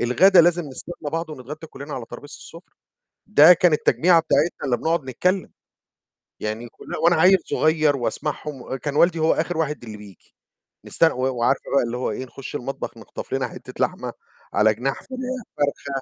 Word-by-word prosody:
الغدا 175 +10 +6
لازم 175 +1 +3
نستنى 145 +2 -7
بعض 165 -1 -3
ونتغدّى 150 +3 -8
كُلّنا 145 0 -8
على 120 - -5
ترابيزة 145 - -10
السفرة، 165 +2 -12 0.6
ده 180 -5 +8
كان 175 -1 +3
التجميعة 165 +3 +4
بتاعتنا 160 0 0
اللي 125 -3 +1
بنقعد 165 0 -1
نتكلم، 180 +9 -1 0.9
يعني 110 +2 -4
كلن - - -9
وأنا 175 - +5
عيّل 190 +1 +7
صغيّر 155 -2 +2
وأسمعهم 150 +2 -4
وكان 140 +3 -5
والدي 170 +1 +3
هو 160 +1 +3
آخر 165 +1 -2
واحد 150 -5 -2
اللي 110 -2 -8
بييجي، 100 -4 -16 0.5
نستن 165 -1 +2
و 130 - -6 0.2
وعارف 120 +4 +2 0.2
بقى - - +4
اللي 120 +1 -3
هو 125 - -2
إيه؟ 130 +5 -4
نخُش 135 +2 -10
المطبخ 135 +1 -5
نخطف - - -9
لنا - - -1
حتّة - - -11
لحمة، - - -1 0.4
على 110 0 +3
جناح 130 +5 -2
فراخ - - -22 0.5
فرخة 140 0 -1
150 Hz, 170 wpm, -23 LUFS, 130-165 Hz, 0.9 s, ده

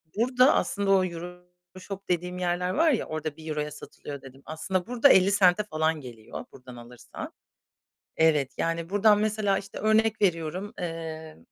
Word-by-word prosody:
Burada 250 +5 +4
aslında 200 -1 0
o 190 -1 +4
Euroshop 180 +2 -10
dediğim 180 +1 -1
yerler 180 0 -1
var 320 - +3
ya, 250 - 0
orada 155 -1 -4
€1'ya 150 -2 -4
satılıyor 145 -1 -9
dedim. 135 0 -14
Aslında 180 +4 -3
burada 245 +3 +4
¢50'e 190 -1 +5
falan 160 -5 -1
geliyor 115 -4 -9
buradan 125 -1 -13
alırsan. 120 0 -10 0.8
Evet, 150 -4 +3
yani, 165 0 -2
buradan 205 +1 +4
mesela, 210 -2 +1
işte, 195 - -8
örnek 220 0 +2
veriyorum, 180 +1 -1
eee, 160 -2 -6
180 Hz, 140 wpm, -27 LUFS, 155-200 Hz, 0.8 s, ¢50'e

